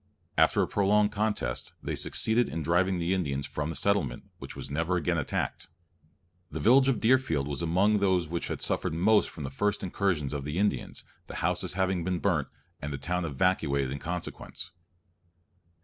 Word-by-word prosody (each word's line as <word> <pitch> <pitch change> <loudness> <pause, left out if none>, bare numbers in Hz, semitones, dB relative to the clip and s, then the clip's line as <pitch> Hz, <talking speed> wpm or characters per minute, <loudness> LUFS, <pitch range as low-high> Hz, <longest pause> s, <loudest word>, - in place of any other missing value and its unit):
After - - +4
a - - -1
prolonged 105 +1 +3
contest, 105 - -2
they - - -2
succeeded 115 +2 +1
in 80 0 -3
driving 90 +3 +2
the 85 +2 0
Indians 70 -7 -1
from 75 +2 -3
the 80 - -4
settlement, 100 -12 0
which - - -8
was - - -6
never 80 +5 0
again 85 -1 0
attacked. 70 - -3 0.8
The - - -5
village 130 +4 +5
of 135 - +1
Deerfield 110 - +2
was 70 +2 -3
among 95 +6 +3
those 95 -4 +2
which 85 +2 -3
had - - -4
suffered - - -1
most 105 +5 +3
from 75 - -8
the 70 - -5
first 105 +9 0
incursions 90 -6 -1
of 70 -2 -3
the 75 +3 -4
Indians, 105 +2 -1 0.2
the - - -8
houses - - 0
having 95 -2 0
been 90 0 -1
burnt, 80 - +1 0.3
and 70 - -4
the 70 - -3
town 90 +3 -2
evacuated 70 -4 +1
in 70 - -4
consequence. 90 +2 -6
90 Hz, 180 wpm, -28 LUFS, 75-100 Hz, 0.8 s, village